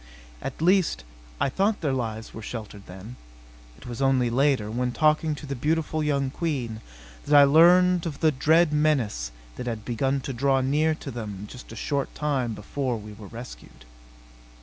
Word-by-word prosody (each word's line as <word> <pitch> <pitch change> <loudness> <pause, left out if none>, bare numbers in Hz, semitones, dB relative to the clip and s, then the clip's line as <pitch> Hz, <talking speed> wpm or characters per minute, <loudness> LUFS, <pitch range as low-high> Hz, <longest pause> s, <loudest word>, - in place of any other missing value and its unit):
At - - -5
least 185 0 +3 0.4
I - - +2
thought 200 +9 0
their 145 -5 0
lives 110 -3 -4
were 110 - -8
sheltered 105 -3 -8
then. 95 +7 -10 0.6
It - - -16
was 120 +1 -6
only 130 -3 +2
later, 130 -4 +2
when 125 +2 -1
talking 155 +1 +2
to 145 - -9
the 140 -1 -4
beautiful 155 +3 -1
young 140 -3 0
Queen, 130 -9 -3 0.5
that 145 0 +7
I - - +9
learned 175 +4 +5
of 150 -4 -6
the 160 -1 +4
dread 155 +3 +3
menace 130 - +1 0.3
that 125 - -5
had 115 -3 -4
begun 135 +3 0
to 135 - -5
draw 135 +2 +2
near 150 +4 +1
to 145 - -8
them 105 -4 -6
just 125 +3 -11
a - - -8
short 140 +4 -2
time 135 -7 -1
before 125 +4 -3
we 105 0 -10
were 105 -1 -11
rescued.... 120 +4 -11
135 Hz, 175 wpm, -25 LUFS, 115-155 Hz, 0.6 s, I